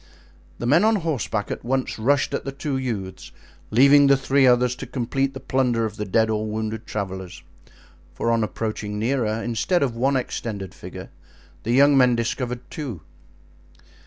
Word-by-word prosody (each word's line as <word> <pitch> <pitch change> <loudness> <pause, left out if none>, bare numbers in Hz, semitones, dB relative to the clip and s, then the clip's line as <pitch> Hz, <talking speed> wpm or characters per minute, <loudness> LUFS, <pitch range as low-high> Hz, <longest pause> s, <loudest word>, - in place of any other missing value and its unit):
The - - -5
men 150 +10 +4
on 220 +1 +4
horseback 145 - -2
at - - -5
once 130 -1 -2
rushed 140 +5 +2
at - - -2
the 135 - -4
two 140 +1 -4
youths, 110 -8 -4 0.4
leaving 140 +5 +6
the 140 0 +5
three 135 0 +3
others 125 0 +3
to - - -7
complete 135 +2 -2
the - - -5
plunder 125 -3 0
of 110 -1 -5
the 105 - -3
dead 110 +3 +2
or 110 -1 -1
wounded 110 0 -4
travelers; 95 -3 -5 0.7
for 115 - 0
on 115 -1 +2
approaching 110 -1 -4
nearer, 115 -1 0
instead 120 - 0
of 125 -4 -1
one 135 +4 +1
extended 105 -6 -4
figure, - - -10 0.5
the 115 - -1
young 140 +2 +6
men 125 -2 +5
discovered 120 +1 -2
two. 135 - -6
120 Hz, 165 wpm, -23 LUFS, 110-135 Hz, 0.7 s, leaving